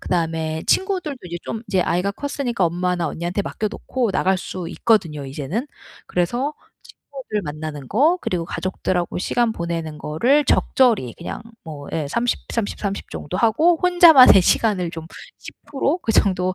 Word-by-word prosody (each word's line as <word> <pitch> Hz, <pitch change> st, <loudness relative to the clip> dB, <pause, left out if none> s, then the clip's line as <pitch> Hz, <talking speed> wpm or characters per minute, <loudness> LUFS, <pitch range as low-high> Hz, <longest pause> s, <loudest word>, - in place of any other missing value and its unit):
그다음에 160 Hz, -2 st, -2 dB
친구들도 370 Hz, -7 st, 0 dB
이제 170 Hz, -, -4 dB
좀 225 Hz, 0 st, -5 dB
이제 190 Hz, -2 st, +2 dB
아이가 180 Hz, +3 st, 0 dB
컸으니까 245 Hz, -4 st, -2 dB
엄마나 175 Hz, 0 st, 0 dB
언니한테 175 Hz, +6 st, -3 dB
맡겨 215 Hz, +1 st, -3 dB
놓고 240 Hz, 0 st, -2 dB
나갈 190 Hz, 0 st, +1 dB
수 175 Hz, -1 st, -6 dB
있거든요 170 Hz, -11 st, +1 dB
이제는. 150 Hz, -, -4 dB, 0.4 s
그래서 240 Hz, -, -1 dB, 0.3 s
친구들 255 Hz, -7 st, -7 dB
만나는 150 Hz, -3 st, -6 dB
거 310 Hz, -, +3 dB
그리고 175 Hz, -2 st, -2 dB
가족들하고 180 Hz, -2 st, -2 dB
시간 235 Hz, +4 st, 0 dB
보내는 165 Hz, -4 st, -4 dB
거를 250 Hz, -, +2 dB
적절히 220 Hz, -, +2 dB
그냥 170 Hz, -, -6 dB, 0.2 s
뭐 145 Hz, -3 st, -9 dB
예 155 Hz, -3 st, -2 dB
30, 235 Hz, +8 st, 0 dB
30, 225 Hz, -3 st, -2 dB
30, 200 Hz, -1 st, -4 dB
정도 180 Hz, +5 st, -5 dB
하고' 310 Hz, +10 st, +3 dB
혼자만의 335 Hz, -, +8 dB
시간을 185 Hz, -4 st, +1 dB
좀 165 Hz, -1 st, -8 dB, 0.3 s
10% 290 Hz, +3 st, -3 dB
그 225 Hz, -, -1 dB
정도 185 Hz, -2 st, +2 dB
190 Hz, 320 characters per minute, -21 LUFS, 165-245 Hz, 0.4 s, 혼자만의